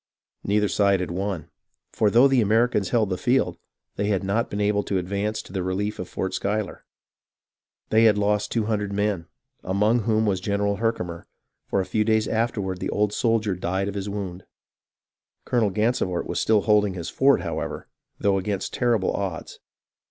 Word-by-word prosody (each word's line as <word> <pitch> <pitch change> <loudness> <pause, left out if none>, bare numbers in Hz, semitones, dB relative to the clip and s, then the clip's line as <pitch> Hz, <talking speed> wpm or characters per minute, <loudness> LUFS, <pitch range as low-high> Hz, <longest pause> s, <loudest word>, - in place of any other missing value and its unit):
Neither 105 +1 +2
side 100 -1 +2
had 90 -1 -3
won; 95 -3 -3 0.4
for 105 - +3
though 120 +6 +6
the 135 -3 +3
Americans 110 -1 +2
held 110 -5 +1
the 90 - -2
field, 130 +6 +1 0.4
they 100 - 0
had 100 -3 0
not 100 +4 0
been 100 - -4
able 105 0 +2
to 95 - 0
advance 100 +4 -2
to - - -14
the 95 - -1
relief 95 +3 -2
of 90 - -5
Fort 95 - -3
Schuyler. 105 -1 -2 1.1
They 110 +1 +5
had 105 -2 +5
lost 105 0 +1
two 115 -3 0
hundred 105 -2 -1
men, 100 -4 -1 0.4
among 105 +5 +2
whom 110 0 +1
was 100 -3 +1
General 100 0 0
Herkimer, 90 -7 -2 0.4
for 100 - +1
a - - -3
few 105 +3 0
days 110 0 +2
afterward 105 -5 -1
the - - -3
old 105 0 0
soldier 115 -4 +1
died 95 +2 -2
of 100 - -3
his 100 0 -4
wound. 95 -3 -5 1.0
Colonel 115 -4 +2
Gansevoort 105 -3 0
was - - -2
still 110 -2 +3
holding 105 -2 +2
his 85 -2 -5
fort, 140 +1 +4
however, - - -4 0.3
though 100 -1 +2
against 100 0 -3
terrible 115 -6 +1
odds. 95 -5 -4
105 Hz, 175 wpm, -24 LUFS, 95-110 Hz, 1.1 s, though